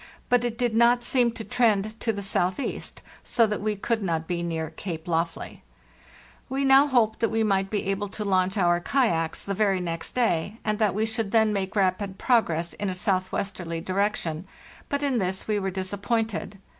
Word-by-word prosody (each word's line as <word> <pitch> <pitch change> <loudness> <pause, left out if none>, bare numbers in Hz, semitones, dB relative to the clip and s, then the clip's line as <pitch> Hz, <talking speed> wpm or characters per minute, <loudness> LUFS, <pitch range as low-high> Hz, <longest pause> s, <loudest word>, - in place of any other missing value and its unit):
But 245 -1 +4
it 235 -1 -2
did 240 -2 0
not 240 +2 +4
seem 245 -1 +3
to 225 - -6
trend 220 -3 +1
to 225 - 0
the 200 -2 -5
south 185 0 0
east, 275 - -4 0.2
so 230 - +3
that 210 -2 -2
we 210 0 0
could 225 +3 -1
not 165 -4 -1
be 175 -1 -2
near 160 -2 -3
Cape 165 -1 -6
Lofley. 165 0 -2 0.9
We 270 +1 0
now 270 +2 +6
hoped 235 -5 +2
that 230 - +2
we 225 0 +1
might 195 -2 +1
be 210 -1 -1
able 195 +1 -1
to 210 +1 -5
launch 190 0 +1
our 175 -2 +3
kayaks 175 -7 0
the 200 - -3
very 195 -2 +2
next 165 -2 -4
day, 215 -4 0
and 215 0 0
that 210 -4 +2
we 215 +1 +1
should 220 -2 -2
then 220 -2 +4
make 195 -1 -2
rapid 190 0 0
progress 175 -9 +1
in 205 - -3
a 185 - -3
southwesterly 185 -3 -2
direction; 185 -2 -1 0.4
but 285 0 -1
in 270 -4 +1
this 190 -1 -2
we 210 -1 +1
were 195 -1 -1
disappointed. 200 +3 -2
200 Hz, 195 wpm, -26 LUFS, 185-225 Hz, 0.9 s, now